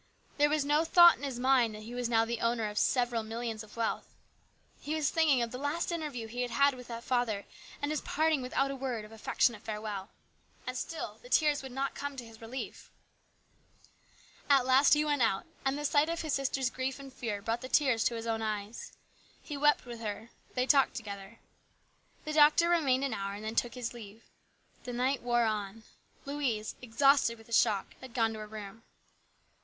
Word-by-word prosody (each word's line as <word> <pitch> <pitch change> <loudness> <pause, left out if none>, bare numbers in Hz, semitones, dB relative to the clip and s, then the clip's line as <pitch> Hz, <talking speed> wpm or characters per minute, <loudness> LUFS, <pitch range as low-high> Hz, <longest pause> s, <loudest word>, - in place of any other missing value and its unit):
There 295 0 +5
was 300 -1 +1
no 295 +2 +3
thought 345 +1 +8
in - - -16
his 275 -4 -4
mind 250 -4 +3
that 215 - -9
he 230 +3 -8
was 245 -1 -2
now 225 -1 +3
the 235 0 -3
owner 230 -2 +1
of 210 0 -2
several 245 -2 +1
millions 225 0 -4
of 220 0 -13
wealth. 230 -1 -2 0.6
He 305 +2 -3
was 305 -3 +1
thinking 300 -7 +3
of 230 - -4
the 250 - -6
last 300 +5 -1
interview 300 -9 -4
he 240 +3 -5
had 280 +3 +3
with 250 -1 -10
that 235 0 -6
father 240 -6 0 0.4
and 290 - 0
his 305 - -1
parting 315 -2 +1
without 270 +2 0
a - - -4
word 250 -5 -3
of 215 - -14
affectionate 225 0 0
fare 215 -1 -4
well. 205 -2 -5 0.6
And 255 - -4
still 320 +6 -5
the - - -14
tears 300 -7 +3
would 265 -1 -8
not 270 +2 -2
come 285 -1 -5
to 245 - -6
his 225 0 -14
relief. 240 +4 -7 1.6
At 275 -3 +5
last 260 +2 +6
he 300 +1 +1
went 290 -3 +1
out, 210 -4 +2 0.2
and 270 +1 0
the 295 - -3
sight 295 +2 +3
of 335 0 -2
his 310 -3 -2
sister's 270 -2 0
grief 260 0 -3
and 275 -2 -11
fear 220 -6 -3
brought 225 +4 -2
the 255 - -7
tears 260 -7 +3
to 235 - +1
his 230 0 -5
own 225 -1 -1
eyes. 215 0 -4 0.5
He 295 - -6
wept 295 0 +3
with 240 -1 -8
her. 225 +1 -5 0.2
They 250 0 +1
talked 275 0 +4
together. 200 0 -7 0.9
The 305 - -3
doctor 305 +3 +6
remained 275 -6 +3
an 275 -4 -1
hour 200 -1 -3
and 210 +1 -8
then 220 - -3
took 235 +1 0
his 245 -2 -4
leave. 220 -1 -11 0.6
The 245 - -6
night 255 +2 0
wore 240 -1 +2
on. 215 0 -3 0.4
Louise, 270 -7 -2
exhausted 250 0 +3
with 225 - -16
the 230 - -10
shock, 210 -4 +2
had 260 -2 -11
gone 225 -2 +2
to 220 - -7
her 215 - -7
room. 210 0 -9
245 Hz, 205 wpm, -31 LUFS, 225-280 Hz, 1.6 s, thought